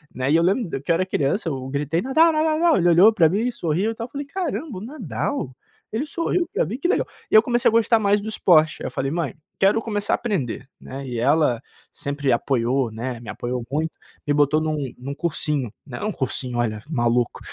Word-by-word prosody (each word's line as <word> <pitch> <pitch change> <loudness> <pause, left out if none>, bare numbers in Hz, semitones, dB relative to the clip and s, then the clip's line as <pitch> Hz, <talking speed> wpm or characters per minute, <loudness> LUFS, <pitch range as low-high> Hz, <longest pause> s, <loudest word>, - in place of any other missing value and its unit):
né. 130 +2 0
E - - +5
eu 165 - +3
lembro 185 - 0
que 145 - -16
eu - - +4
era 185 +2 +1
criança, 165 +2 0
eu 130 -2 -4
gritei: 145 +4 -1
"Nadal, 315 +6 +4
Nadal, 310 0 +2
Nadal," 340 -1 +4
ele 175 -1 +2
olhou 185 +6 +7
pra 165 -6 +5
mim 200 +5 0
e - - 0
sorriu 180 +4 -1
e - - -7
tal. 230 +1 -5
Falei: 285 +2 -5
"Caramba, 315 - -3
o - - -11
Nadal, 150 - -4 0.4
ele 230 +8 -1
sorriu 340 +3 -1
pra - - +1
mim 220 +10 -4
que 350 - 0
legal." - - +1 0.2
E - - +3
eu 215 - +10
comecei 240 0 +3
a - - -2
gostar 230 0 +4
mais 205 0 +3
do 215 - -7
esporte, 160 -6 +3
aí - - -2
eu - - -6
falei: 135 0 -2
"Mãe, 165 -4 -2 0.2
quero 200 +4 +4
começar 205 -2 -1
a - - +5
aprender," 135 - -3
né, 135 +1 -7
e 120 -2 -4
ela 135 -2 +2 0.3
sempre 140 -1 -2
apoiou, 125 0 0
né, 120 +2 -5
me 110 - -9
apoiou 120 +3 -4
muito, 155 +2 -1 0.4
me 145 - +3
botou 150 +1 +3
num 150 -5 -2
num 135 +3 -6
cursinho, 150 -6 -1
né. 125 +3 -7
Um 215 - 0
cursinho, 130 -4 -3
olha, 110 -2 -1
maluco, 120 -4 +1
160 Hz, 225 wpm, -23 LUFS, 130-220 Hz, 0.4 s, eu